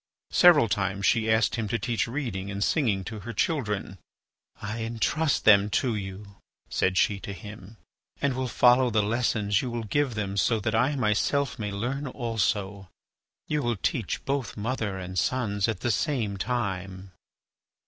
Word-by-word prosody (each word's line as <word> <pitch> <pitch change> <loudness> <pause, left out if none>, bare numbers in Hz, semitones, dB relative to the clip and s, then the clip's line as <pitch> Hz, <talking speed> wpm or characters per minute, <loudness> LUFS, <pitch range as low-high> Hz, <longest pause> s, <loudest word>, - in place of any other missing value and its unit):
Several 170 -9 +6
times 100 -1 -1
she 110 -1 +2
asked 110 +2 +2
him 110 -2 -2
to 115 - 0
teach 115 0 -1
reading 115 -7 -4
and 100 0 -2
singing 105 -10 +1
to 110 +2 -6
her 115 +4 -7
children. 105 - -1 0.6
"I 105 +3 -5
entrust 120 +7 0
them 100 -1 +6
to 125 -3 0
you," 100 0 -7 0.3
said 95 0 +1
she 100 +1 +2
to 100 - -7
him. 105 +2 -11 0.4
"And 140 -2 +1
will 130 0 -2
follow 125 +2 +4
the 110 -2 +2
lessons 105 -2 +1
you 125 - -3
will 120 -1 -3
give 130 +3 0
them 100 -2 -3
so 115 +2 +2
that - - -1
I 140 +3 +2
myself 130 +4 0
may 105 -2 -3
learn 125 +8 -3
also. 105 -6 -2 0.6
You 150 -1 0
will 120 -4 -1
teach 110 +2 -2
both 135 -4 -2
mother 105 -3 -2
and 95 0 -3
sons 105 -5 0
at 110 -5 -3
the 120 - +1
same 110 -1 -1
time." 95 -4 -3
110 Hz, 165 wpm, -27 LUFS, 100-125 Hz, 0.6 s, Several